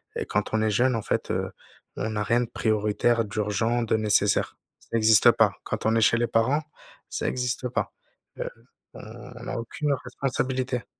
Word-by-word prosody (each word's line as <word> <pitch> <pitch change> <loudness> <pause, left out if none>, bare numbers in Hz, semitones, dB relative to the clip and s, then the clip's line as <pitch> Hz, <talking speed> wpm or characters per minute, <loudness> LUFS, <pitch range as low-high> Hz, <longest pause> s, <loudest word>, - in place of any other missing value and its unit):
et - - -2
quand 105 +1 -2
on 110 - +2
est 110 - +2
jeune, 125 +3 +2
en 110 - -1
fait, - - -2
heu, - - -2 0.5
on 110 0 -2
a 105 - 0
rien 120 +3 +2
de 120 - -3
prioritaire, 110 +2 +1
d'urgent, 110 +3 0
de 110 - +1
nécessaire. 105 -1 +2 0.2
Ça 115 - -3
existe 110 -2 +6
pas. - - +3
Quand - - -4
on 110 +1 +3
est 115 - +3
chez 115 +2 +4
les 120 0 +1
parents, 125 +7 +2 0.5
ça - - -3
existe 125 0 -1
pas. 125 - -2 0.5
Heu, - - -2 0.4
on 120 +2 -10
a - - -3
aucune, 130 +6 -2
heu, 140 - +3
responsabilité. 130 0 -2
115 Hz, 185 wpm, -26 LUFS, 110-125 Hz, 0.5 s, existe